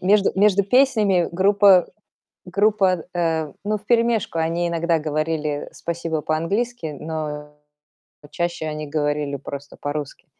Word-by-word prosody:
между 200 +2 +3
между 200 0 +4
песнями 210 -7 +3
группа 195 0 +5 0.6
группа, 195 -2 +2
э, 160 -4 -1
ну, 210 +1 0
вперемешку 230 -4 +1
они 165 +2 0
иногда 170 -1 0
говорили 155 -1 -2
"спасибо" 165 -2 -3
по-английски, 165 +1 -2
но 150 -2 -5 0.7
А, - - -13
чаще 170 -2 -3
они 155 0 -4
говорили 145 -1 -1
просто 140 +1 -8
по-русски. 145 -1 -5
170 Hz, 115 wpm, -22 LUFS, 155-200 Hz, 0.7 s, группа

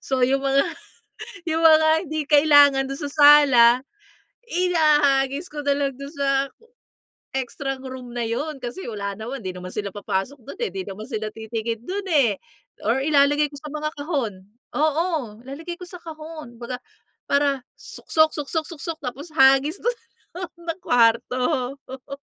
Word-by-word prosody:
So, 265 -2 0
yung 270 +1 +1
mga 275 +1 +4 0.9
yung 325 - +1
mga 315 0 +7 0.2
hindi 310 0 -2
kailangan 285 -2 +6
dun 275 - -4
sa 290 -2 -4
sala, 290 -5 +7 0.8
ihahagis 300 -4 +2
ko 295 -1 -5
na 285 - +3
lang 275 -1 -1
do'n 280 0 -7
sa 280 -2 -1 1.1
extrang 265 +1 -4
room 255 -2 -8
na 240 - -2
yun. 280 +6 -3
Kasi 245 +11 -6
wala 200 -3 -4
naman, 240 +3 -6
'di 185 - -2
naman 180 0 -7
sila 205 -2 -3
papasok 205 +6 -3
do'n 400 - -9
eh, 460 - 0
'di 380 -1 -4
naman 210 +3 -7
sila 215 -1 -3
titingin 225 0 -4
do'n 390 +4 -4
eh. 265 -10 +4 0.5
Or 235 +4 +2
ilalagay 290 0 +3
ko - - -9
sa 300 - -8
mga 305 0 -2
kahon 285 - -2 0.4
oo, 305 -7 0
ilalagay 320 +6 -7
ko 360 - -8
sa 360 - -9
kahon. 310 -6 -9
Kumbaga, 250 +1 -4 0.5
para 280 -2 +1 0.2
suksok 315 0 +1
suksok 310 +1 -3
suksok, 330 -1 -6
tapos 280 +5 -7
hagis 270 +3 +4
do'n, 485 +1 -1 0.7
sa 330 - 0
kwarto. 250 +1 +2
Oo. 265 +1 -9
280 Hz, 155 wpm, -23 LUFS, 245-310 Hz, 1.1 s, mga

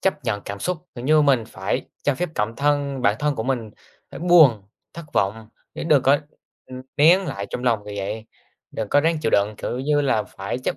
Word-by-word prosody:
chấp 150 -8 -1
nhận 105 -3 -1
cảm 100 0 -6
xúc, 180 0 -1 0.2
kiểu 120 0 -7
như 155 +1 +4
mình 130 -6 +3
phải 95 -3 -3 0.2
cho 145 - +1
phép 180 +6 -2
cảm 105 +2 -2
thân 140 -2 0
bản 105 -1 +3
thân 150 -1 0
của 110 - -3
mình 120 -4 -2 0.4
phải - - -9
buồn, 160 - +6 0.3
thất 170 0 -9
vọng. 110 +3 -1 0.3
Chứ - - -5
đừng 145 -5 +5
có, 140 +2 +4 0.5
ừm, 130 0 -9
nén 165 +6 +6
lại 100 -8 -4
trong 125 - -4
lòng, 115 -3 +3
kiểu 105 0 -7
vậy, 105 +3 -4 0.5
đừng 110 -2 -4
có 145 - +4
ráng 165 +1 +1
chịu - - +1
đựng, 100 +1 +2
kiểu 125 - -4
như 145 +2 +1
là 130 -6 +1
phải 100 +3 -6
chấp 130 - -3
130 Hz, 225 wpm, -22 LUFS, 110-145 Hz, 0.5 s, buồn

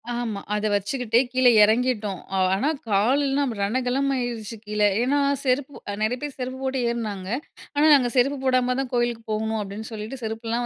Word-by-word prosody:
ஆமா, 225 -4 -3 0.2
அதை 210 +1 0
வச்சுக்கிட்டே 230 +4 +1
கீழ 255 0 +3 0.2
இறங்கிட்டோம். 215 -3 +1 0.2
ஆ - - +1 0.2
ஆனா 240 +10 0 0.2
கால் 230 +8 +3
எல்லாம் 275 -1 0
ரணகலமாயிருச்சு 245 0 -1
கீழ. 210 0 -4 0.2
ஏன்னா 275 +4 +2 0.2
செருப்பு 270 +1 0 0.2
அ - - -3
நிறைய 245 +4 0
பேர் 290 -2 -5
செருப்பு 255 +1 -4
போட்டு 265 0 -1
ஏறினாங்க, 210 -5 -4 0.5
ஆனா 295 +2 +4
நாங்க 250 -3 +2
செருப்பு 275 +3 +3
போடாம 255 -1 +2
தான் 270 -2 -3
கோயிலுக்கு 240 -1 0
போகணும் 220 +1 -1
அப்படின்னு 205 +2 -6
சொல்லிட்டு, 220 +4 -6
செருப்புலாம் 225 +2 -2
240 Hz, 165 wpm, -24 LUFS, 215-260 Hz, 0.5 s, ஆனா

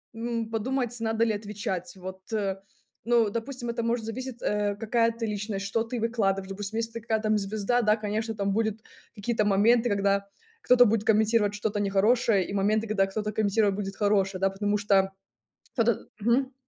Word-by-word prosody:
м, 230 -1 -3
подумать 245 +2 -1
надо 225 0 +1
ли 225 - +1
отвечать 205 0 -4
вот, 185 0 -8
э, 195 -3 -1 0.5
ну, 235 -2 +3
допустим, 240 +2 -4
это 235 0 -2
может 230 -1 -1
зависеть, 250 +2 -6
э, 205 -1 0
какая 230 +1 +2
ты 230 0 -4
личность, 205 -1 -3
что 225 +3 0
ты 235 +1 -4
выкладываешь. 195 -4 0
Допустим, 205 +2 -3
если 230 0 -2
ты 230 - -6
какая 220 -1 0
там 215 -1 +2
звезда, 215 +4 0
да, 210 0 +4
конечно 220 +1 -3
там 200 -2 -1
будет 220 0 0 0.4
какие-то 215 +1 0
моменты, 225 +4 +4
когда 200 -1 +1 0.4
кто-то 245 0 +6
будет 215 -1 +1
комментировать 215 -1 +3
что-то 205 0 -2
нехорошее 205 0 +2
и - - -6
моменты, 210 +3 +1
когда 205 -2 +2
кто-то 210 +2 -3
комментировать 210 -1 +2
будет 195 -1 -4
хорошее, 195 -2 +1
да. 195 - +3
Потому 205 +2 -1
что 195 -2 +2 0.6
кто-то 230 -3 +1
мгм. 250 +5 +2
215 Hz, 175 wpm, -27 LUFS, 200-230 Hz, 0.6 s, кто-то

